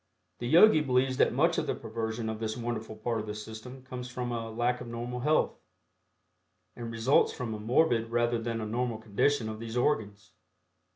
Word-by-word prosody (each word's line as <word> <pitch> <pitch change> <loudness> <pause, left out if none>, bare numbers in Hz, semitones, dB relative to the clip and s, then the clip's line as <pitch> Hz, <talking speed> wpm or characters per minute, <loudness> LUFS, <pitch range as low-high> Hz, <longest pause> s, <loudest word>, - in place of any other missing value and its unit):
The 120 - -3
Yogi 170 - +7
believes 130 -1 +1
that - - +4
much - - +2
of - - -3
the - - 0
perversion 110 0 -4
of 110 -1 -3
this 110 0 -3
wonderful 115 -2 -4
part 115 +1 -2
of 105 - -5
the 105 - -4
system 110 +5 -9
comes 125 -1 -7
from 125 0 -4
a 115 -1 -3
lack 120 +2 0
of - - -7
normal 120 +1 -4
health, 150 +5 +1 1.2
and 120 -1 -6
results 115 +4 +3
from 120 -3 -4
a 105 - -5
morbid 115 0 +2
rather 120 0 +1
than 115 0 -3
a - - -3
normal 120 +1 -1
condition 110 +4 +1
of 110 0 -5
these 115 +1 -5
organs. 105 -6 -1
115 Hz, 190 wpm, -30 LUFS, 110-125 Hz, 1.2 s, Yogi